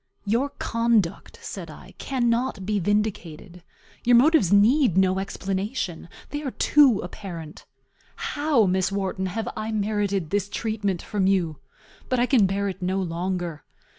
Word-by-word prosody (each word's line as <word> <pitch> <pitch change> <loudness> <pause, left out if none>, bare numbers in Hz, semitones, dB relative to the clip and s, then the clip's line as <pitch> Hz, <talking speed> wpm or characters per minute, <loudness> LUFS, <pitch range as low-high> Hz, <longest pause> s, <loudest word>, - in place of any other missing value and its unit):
"Your 235 +7 +1
conduct," 230 -6 0
said - - -7
I, - - -12
"cannot 240 -5 -1
be 210 0 0
vindicated; 185 -3 -2 0.4
your 245 0 +5
motives 265 - +5
need 215 - +4
no 190 0 +3
explanation; 195 -2 -4 0.2
they 290 - -3
are 285 - -3
too 265 -4 +4
apparent. 175 -4 -8 0.5
How, 290 -6 +1
Miss 185 0 +1
Wharton, 190 -1 -2
have 220 +5 -4
I 215 +1 -4
merited 205 -5 -1
this 205 -1 0
treatment 205 -5 -2
from 195 -2 0
you? 175 -6 +1 0.5
But 255 - +1
I 245 - +4
can 245 -7 +4
bear 200 +1 -1
it 190 -1 -5
no 185 +2 0
longer. 175 -2 -3
200 Hz, 140 wpm, -24 LUFS, 185-230 Hz, 0.5 s, your